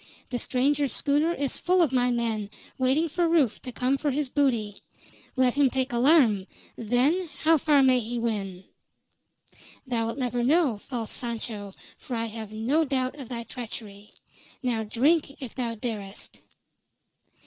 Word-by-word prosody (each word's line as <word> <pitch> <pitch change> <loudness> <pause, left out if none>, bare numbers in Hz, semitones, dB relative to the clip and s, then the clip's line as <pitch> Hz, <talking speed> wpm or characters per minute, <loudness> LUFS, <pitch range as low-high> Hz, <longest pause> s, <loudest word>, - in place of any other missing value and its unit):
The 245 - -1
stranger's 275 +1 +1
schooner 295 +3 +2
is 280 -5 -1
full 365 +1 +2
of 305 - +1
my 250 -1 +2
men, 225 -4 -1 0.3
waiting 265 +6 +2
for 340 +2 0
Rufe 295 -9 +2
to 255 - -7
come 255 +3 0
for 295 - 0
his 280 -1 -2
booty. 235 -8 0 0.5
Let 255 -2 +3
him 280 -1 +3
take 260 0 -1
alarm, 235 - +4 0.3
then 270 - +1
how 320 0 +5
far 290 -1 +4
may 255 -1 +5
he 240 +1 -4
win? 200 -6 -3 1.2
Thou'lt 230 -1 -1
never 245 -2 -1
know, 280 -5 +3
false 230 -1 -5
Sancho, 220 -4 -4 0.2
for 250 - -5
I 230 0 -1
have 220 -1 -7
no 240 +9 +1
doubt 265 -1 -1
of 260 - -8
thy 235 -2 -4
treachery. 215 -4 -8 0.5
Now 240 -3 0
drink, 280 +7 +1
if 260 -5 -6
thou 235 -3 -3
darest!" 210 -3 -6
250 Hz, 150 wpm, -26 LUFS, 225-280 Hz, 1.2 s, how